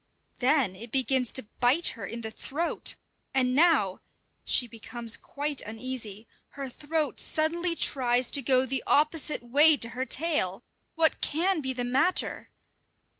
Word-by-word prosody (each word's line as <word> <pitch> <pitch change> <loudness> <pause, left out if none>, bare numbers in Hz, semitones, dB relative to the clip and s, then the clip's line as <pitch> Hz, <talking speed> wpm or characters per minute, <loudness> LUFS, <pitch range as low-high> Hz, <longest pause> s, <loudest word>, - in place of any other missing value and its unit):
Then 255 -7 +2
it 225 +4 -10
begins 260 -2 +1
to 260 - -1
bite 255 +8 +4
her 230 - -7
in 235 +1 -6
the 220 -1 -5
throat! 320 +9 -1 0.4
And 255 -1 +2
now 280 - +3 0.4
she 245 - +2
becomes 230 0 -2
quite 290 0 -3
uneasy 220 -2 -6 0.3
her 275 -1 -4
throat 300 +2 -3
suddenly 335 +2 0
tries 250 -5 +1
to 280 - +2
go 260 0 +3
the 265 0 -1
opposite 300 -2 +2
way 290 +5 +6
to 230 - +1
her 255 +2 -4
tail! 245 - -1 0.3
What 320 -1 +2
can 335 +3 0
be 265 -2 -2
the 250 -1 -3
matter? 275 +9 0
265 Hz, 145 wpm, -27 LUFS, 240-305 Hz, 0.4 s, way